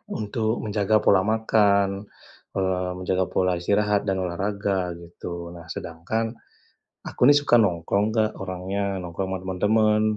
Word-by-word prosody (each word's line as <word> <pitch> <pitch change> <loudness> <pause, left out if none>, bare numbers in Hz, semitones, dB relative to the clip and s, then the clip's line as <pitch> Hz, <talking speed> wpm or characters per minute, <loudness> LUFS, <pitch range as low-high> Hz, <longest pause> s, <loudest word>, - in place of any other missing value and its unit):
untuk 110 +1 -2
menjaga 105 0 +1
pola 95 -3 +5
makan, 100 -2 +2 0.5
eee, 95 -1 0
menjaga 95 0 0
pola 90 -1 +1
istirahat 100 +3 +1
dan 95 -1 0
olahraga, 95 0 -2
gitu. 85 0 -8
Nah 85 -1 -11
sedangkan, 100 +8 -4 0.7
aku - - -9
ini - - +9
suka 145 -4 +4
nongkrong 100 0 +1
Kak 110 -1 +2
orangnya, 95 +1 -3
nongkrong 90 +2 -4
sama 95 - -2
teman-teman. 105 +3 +2
100 Hz, 130 wpm, -24 LUFS, 90-105 Hz, 0.7 s, ini